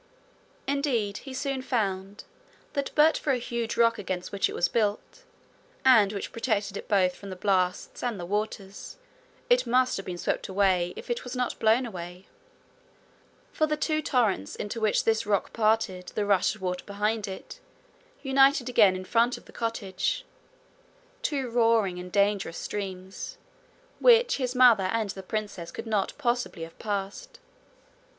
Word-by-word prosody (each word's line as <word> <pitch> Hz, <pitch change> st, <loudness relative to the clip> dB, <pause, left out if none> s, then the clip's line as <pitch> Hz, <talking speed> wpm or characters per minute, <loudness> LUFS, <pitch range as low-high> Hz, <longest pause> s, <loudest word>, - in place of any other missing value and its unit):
Indeed 255 Hz, -8 st, 0 dB
he -, -, -7 dB
soon 275 Hz, -1 st, -2 dB
found 200 Hz, -5 st, -2 dB, 0.5 s
that 280 Hz, -2 st, -1 dB
but 310 Hz, +1 st, +5 dB
for 280 Hz, -, 0 dB
a -, -, +1 dB
huge 235 Hz, -1 st, -3 dB
rock 230 Hz, 0 st, +4 dB
against 185 Hz, -2 st, -4 dB
which 200 Hz, -, +1 dB
it -, -, -6 dB
was 175 Hz, -, +2 dB
built, 220 Hz, -, -2 dB, 0.6 s
and 225 Hz, -7 st, +6 dB
which 200 Hz, -2 st, -5 dB
protected 215 Hz, -4 st, -1 dB
it -, -, -6 dB
both 185 Hz, -4 st, +3 dB
from 200 Hz, -, -11 dB
the 185 Hz, -, -6 dB
blasts 185 Hz, -1 st, 0 dB
and 240 Hz, -5 st, -2 dB
the 175 Hz, -, -5 dB
waters, 205 Hz, 0 st, -4 dB, 0.5 s
it -, -, +3 dB
must 255 Hz, +2 st, +2 dB
have 195 Hz, -, -6 dB
been 180 Hz, -1 st, -4 dB
swept -, -, -2 dB
if 185 Hz, -1 st, 0 dB
it 240 Hz, -, -2 dB
was 250 Hz, 0 st, -6 dB
not 250 Hz, -1 st, -2 dB
blown 225 Hz, +4 st, +3 dB
away; 180 Hz, -3 st, -8 dB, 1.3 s
for 310 Hz, -, +2 dB
the 305 Hz, 0 st, -1 dB
two 310 Hz, 0 st, 0 dB
torrents 220 Hz, -, 0 dB
into 210 Hz, +2 st, -5 dB
which 215 Hz, -1 st, +2 dB
this 220 Hz, -2 st, +1 dB
rock 200 Hz, -2 st, 0 dB
parted 215 Hz, -5 st, +1 dB
the 210 Hz, -, 0 dB
rush 200 Hz, +1 st, +2 dB
of 205 Hz, -, -14 dB
water 180 Hz, 0 st, -2 dB
behind 210 Hz, +1 st, -1 dB
it 190 Hz, -, -8 dB, 0.6 s
united 270 Hz, -1 st, +4 dB
again 210 Hz, -6 st, +5 dB
in 185 Hz, 0 st, -6 dB
front 235 Hz, +5 st, +2 dB
of -, -, -16 dB
the -, -, -15 dB
cottage 225 Hz, -5 st, -2 dB, 1.0 s
two 285 Hz, -, -1 dB
roaring 225 Hz, -6 st, +2 dB
and 180 Hz, 0 st, -8 dB
dangerous 200 Hz, -3 st, +1 dB
streams, 190 Hz, -2 st, -6 dB, 0.6 s
which 485 Hz, 0 st, +5 dB
his 255 Hz, -2 st, -2 dB
mother 240 Hz, -6 st, +6 dB
and 215 Hz, +1 st, -1 dB
the 190 Hz, -, -8 dB
princess 200 Hz, -3 st, -4 dB
could -, -, -7 dB
not 210 Hz, -3 st, 0 dB
possibly 245 Hz, -, -1 dB
have 165 Hz, 0 st, -11 dB
passed. 205 Hz, -, -4 dB
215 Hz, 160 wpm, -27 LUFS, 195-245 Hz, 1.3 s, and